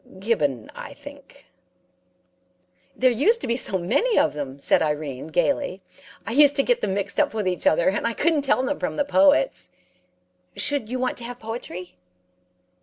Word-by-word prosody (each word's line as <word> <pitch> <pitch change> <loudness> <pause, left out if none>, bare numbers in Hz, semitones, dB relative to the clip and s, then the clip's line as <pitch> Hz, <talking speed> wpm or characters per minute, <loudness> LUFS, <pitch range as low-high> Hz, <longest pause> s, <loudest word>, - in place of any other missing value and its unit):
'Gibbon, 150 - -1
I 285 - -9
think.' 285 -1 -14 1.5
"'There 255 -1 +3
used 400 - +3
to - - -3
be 235 - 0
so 205 -6 +1
many 425 - 0
of - - +3
them,' 140 -2 -6
said - - +2
Irene, 150 -3 -3
gaily. 190 - -1 0.5
'I 225 - -4
used 285 +3 +5
to 275 - +2
get - - +1
them 190 - -1
mixed 200 -1 -3
up - - +1
with 210 -3 -1
each 180 -1 -1
other, 165 - +3
and 205 +4 -1
I 230 - -1
couldn't 315 +4 +1
tell 275 -2 +1
them 285 +2 -2
from - - -3
the 290 - 0
poets. 290 +11 +3 0.9
Should 280 -7 +1
you 255 - -2
want 255 0 -2
to 240 - -2
have 245 0 -8
poetry?' 220 -6 -7
235 Hz, 180 wpm, -23 LUFS, 180-285 Hz, 1.5 s, used